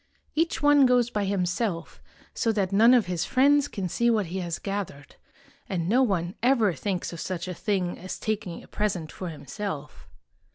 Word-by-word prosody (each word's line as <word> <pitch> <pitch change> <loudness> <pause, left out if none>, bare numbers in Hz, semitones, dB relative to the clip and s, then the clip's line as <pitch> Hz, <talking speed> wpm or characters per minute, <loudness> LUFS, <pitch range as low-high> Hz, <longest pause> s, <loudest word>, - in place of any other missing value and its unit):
Each 325 -3 0
one 290 -2 +6
goes 245 -1 +3
by 210 -2 -1
himself, 185 -1 -2 0.3
so 230 - +1
that 200 -3 0
none 230 +5 +6
of 235 -5 +3
his 180 -2 -2
friends 285 +2 +4
can 195 -8 -4
see 235 +7 +1
what 220 -4 +2
he 180 +3 -4
has 170 -2 -3
gathered; 195 -8 -5 0.5
and 170 -3 -1
no 240 +7 +4
one 185 -7 0
ever 235 -6 +3
thinks 180 +5 -3
of 170 - -7
such 185 -1 -4
a 180 - -3
thing 185 -1 -1
as 185 - -6
taking 205 -5 -3
a - - -16
present 185 -7 -2
for 185 - -6
himself. 155 0 -6
195 Hz, 180 wpm, -26 LUFS, 175-235 Hz, 0.5 s, one